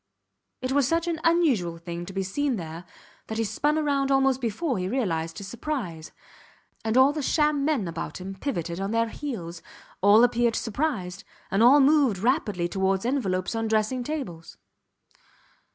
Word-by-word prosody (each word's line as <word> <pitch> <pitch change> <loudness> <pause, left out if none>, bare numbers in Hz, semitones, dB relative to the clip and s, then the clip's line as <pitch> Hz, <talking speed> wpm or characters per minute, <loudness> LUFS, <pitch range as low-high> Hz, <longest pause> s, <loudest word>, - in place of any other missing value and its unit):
It 255 - -1
was 280 -2 +3
such 330 +3 0
an 335 -2 -1
unusual 270 - +2
thing 170 +1 -7
to - - -6
be 195 0 -1
seen 265 +8 -1
there 165 -2 -7 0.4
that 220 - -4
he 225 - +1
spun 290 +8 0
round 275 -1 +1
almost 270 -1 +2
before 245 - -1
he 180 - -2
realized 165 -10 -2
his 200 - -7
surprise; 205 - -5 0.7
and 225 +2 0
all 265 +2 +6
the 305 - -3
sham 300 0 +1
men 280 - 0
about 165 +2 -5
him 190 +1 -6
pivoted 180 - -4
on 195 +1 -2
their 230 +1 +1
heels; 180 - -6 0.4
all 205 +4 +6
appeared 240 -1 +2
surprised; 210 - -2 0.3
and 195 +3 +2
all 255 +5 +7
moved 280 -6 +4
rapidly 210 - 0
towards 190 +2 0
envelopes 195 -9 -1
on 225 0 -1
dressing 220 +3 0
tables. 235 - -6
225 Hz, 165 wpm, -26 LUFS, 185-275 Hz, 0.7 s, all